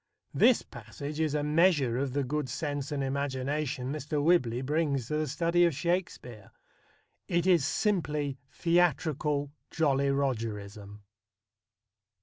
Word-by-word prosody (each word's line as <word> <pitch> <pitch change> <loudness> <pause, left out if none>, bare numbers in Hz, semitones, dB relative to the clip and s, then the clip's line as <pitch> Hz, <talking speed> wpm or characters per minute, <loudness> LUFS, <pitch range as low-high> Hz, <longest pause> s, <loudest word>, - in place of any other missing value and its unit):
This - - +4
passage 145 +2 -8
is 155 -2 0
a 150 - 0
measure 150 -6 +3
of 135 -2 -2
the 140 0 0
good 145 +1 -2
sense 145 +1 -3
and 140 -2 -1
imagination 135 -1 -2
Mr. 150 0 -3
Whibley 140 -6 +2
brings 140 -3 -1
to 150 - 0
the 155 0 -1
study 170 +5 +2
of 170 -5 +2
Shakespeare. 150 - -3 0.8
It 170 0 0
is 175 -6 +4
simply 150 - -1
theatrical 155 -4 +1 0.2
Jolly 140 -3 +1
Rogerism. 105 -6 -3
145 Hz, 125 wpm, -29 LUFS, 130-160 Hz, 0.8 s, This